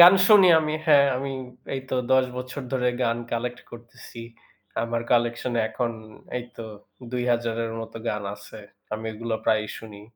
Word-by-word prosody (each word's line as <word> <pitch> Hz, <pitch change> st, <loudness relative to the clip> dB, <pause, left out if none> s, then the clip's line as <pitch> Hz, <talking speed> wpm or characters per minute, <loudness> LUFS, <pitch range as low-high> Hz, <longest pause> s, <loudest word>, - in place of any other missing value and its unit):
গান 175 Hz, +2 st, +11 dB
শুনি 200 Hz, -3 st, +8 dB
আমি। 155 Hz, 0 st, -1 dB
হ্যাঁ, 145 Hz, -2 st, +7 dB
আমি 135 Hz, +1 st, -3 dB, 0.4 s
এইতো 130 Hz, -1 st, -4 dB, 0.2 s
১০ 130 Hz, 0 st, +6 dB
বছর 130 Hz, +3 st, -5 dB
ধরে 125 Hz, -1 st, +2 dB
গান 115 Hz, -1 st, +2 dB, 0.2 s
collect 120 Hz, +1 st, -2 dB
করতেছি। 120 Hz, 0 st, -11 dB, 0.6 s
আমার 115 Hz, 0 st, -1 dB
collection 120 Hz, +1 st, +1 dB
এ -, -, +4 dB
এখন 120 Hz, +1 st, -1 dB, 0.5 s
এইতো 120 Hz, -1 st, -9 dB, 0.5 s
২০০০ 120 Hz, -2 st, 0 dB
এর 115 Hz, -, -4 dB
মতো 115 Hz, 0 st, -7 dB
গান 105 Hz, -1 st, -1 dB
আছে। 110 Hz, -, -12 dB, 0.4 s
আমি 110 Hz, +1 st, -6 dB
এগুলা 115 Hz, +1 st, -3 dB
প্রায়ই 105 Hz, -1 st, +2 dB
শুনি। 105 Hz, -2 st, -11 dB
120 Hz, 155 wpm, -25 LUFS, 115-130 Hz, 0.6 s, গান